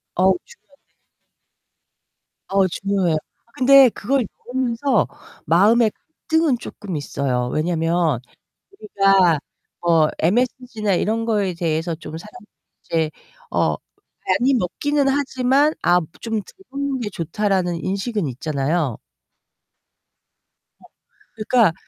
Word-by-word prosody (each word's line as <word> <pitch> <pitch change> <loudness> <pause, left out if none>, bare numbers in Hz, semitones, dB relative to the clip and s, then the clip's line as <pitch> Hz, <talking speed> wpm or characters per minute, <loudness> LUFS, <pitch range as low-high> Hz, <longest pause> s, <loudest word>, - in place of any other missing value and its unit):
어우. 190 +1 +4 0.4
중요한데. - - -35 1.5
어 195 -1 +2
중요해요. 185 -3 0 0.4
근데 270 0 +7
그걸 255 +4 -1 0.2
먹으면서 250 0 0 0.4
마음의 215 +7 +4 0.4
갈등은 320 -5 +3
쪼끔 190 -5 -7
있어요. 130 -4 -2
왜냐하면 165 -3 +1 0.5
우리가 195 - +3 0.4
뭐 165 -3 +4
MSG나 225 +2 0
이런 225 +5 0
거에 205 -5 0
대해서 165 0 -1
좀 160 0 -9
사람들이 210 +2 -13 0.4
이제 160 -2 0 0.4
어 - - +1 0.5
많이 265 +2 +3
먹기는 280 +8 0
하지만 270 +1 +2
아 175 0 +4 0.2
좀 225 -1 -4
'덜 - - -17 0.2
먹는 275 -1 -2
게 210 -3 -3
좋다.'라는 180 0 -1
인식은 200 -1 -2
있잖아요. 140 0 -1 1.8
어. - - -19 0.5
그러니까 220 -3 +3
200 Hz, 240 characters per minute, -21 LUFS, 170-250 Hz, 1.8 s, 근데